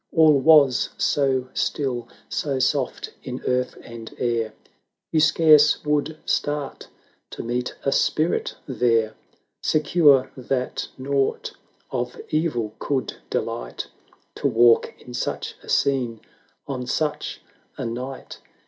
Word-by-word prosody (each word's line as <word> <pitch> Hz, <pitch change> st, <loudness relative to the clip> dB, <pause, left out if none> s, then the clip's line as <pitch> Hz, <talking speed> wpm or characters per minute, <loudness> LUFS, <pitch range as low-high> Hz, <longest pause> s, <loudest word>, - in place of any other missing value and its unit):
All 155 Hz, -3 st, +5 dB
was 140 Hz, -3 st, +5 dB
so 135 Hz, -3 st, +1 dB
still, 130 Hz, -5 st, -1 dB, 0.2 s
so 140 Hz, -3 st, -2 dB
soft 130 Hz, 0 st, -1 dB
in 130 Hz, 0 st, -5 dB
earth 125 Hz, 0 st, 0 dB
and 115 Hz, -1 st, -9 dB
air, 115 Hz, -3 st, -1 dB, 0.6 s
You 160 Hz, -, +3 dB
scarce 155 Hz, -1 st, +5 dB
would 150 Hz, +1 st, 0 dB
start 145 Hz, -1 st, -2 dB, 0.4 s
to -, -, -7 dB
meet 120 Hz, +1 st, -2 dB
a 140 Hz, -, +1 dB
spirit 155 Hz, +4 st, +1 dB
there; 115 Hz, -4 st, +2 dB, 0.5 s
Secure 150 Hz, -3 st, +4 dB
that 130 Hz, 0 st, -2 dB
nought 135 Hz, +1 st, -1 dB, 0.4 s
of 125 Hz, 0 st, -3 dB
evil 135 Hz, -9 st, -1 dB
could 135 Hz, -2 st, -2 dB
delight -, -, -3 dB, 0.5 s
To -, -, +1 dB
walk 120 Hz, -2 st, +4 dB
in 125 Hz, -, -12 dB
such 125 Hz, -, -3 dB
a -, -, -14 dB
scene, 125 Hz, -5 st, +1 dB, 0.4 s
on 130 Hz, -3 st, -4 dB
such 150 Hz, +3 st, -2 dB, 0.4 s
a -, -, -3 dB
night! 125 Hz, +3 st, -6 dB
130 Hz, 115 wpm, -23 LUFS, 120-145 Hz, 0.6 s, All